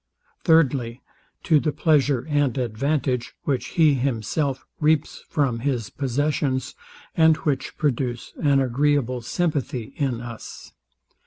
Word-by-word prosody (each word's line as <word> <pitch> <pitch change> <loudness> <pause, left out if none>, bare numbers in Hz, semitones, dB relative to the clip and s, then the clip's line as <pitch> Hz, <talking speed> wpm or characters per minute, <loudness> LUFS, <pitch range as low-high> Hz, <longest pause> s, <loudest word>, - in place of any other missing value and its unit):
Thirdly, 135 -8 +3 0.4
To 155 -2 +4
the 150 - 0
pleasure 145 -4 +2
and 145 -3 +1
advantage, 125 +1 -1
which 135 -3 -1
he 155 -3 +6
himself 135 +2 -1
reaps 155 -1 +1
from 135 -6 0
his 120 -4 -2
possessions, 135 0 -1 0.4
and 160 -1 +5
which 135 -3 -2
produce 125 -4 -2
an 140 -2 +4
agreeable 130 -1 +1
sympathy 135 -3 -2
in 130 -5 -1
us. 120 -1 -9
135 Hz, 110 wpm, -23 LUFS, 125-150 Hz, 0.4 s, he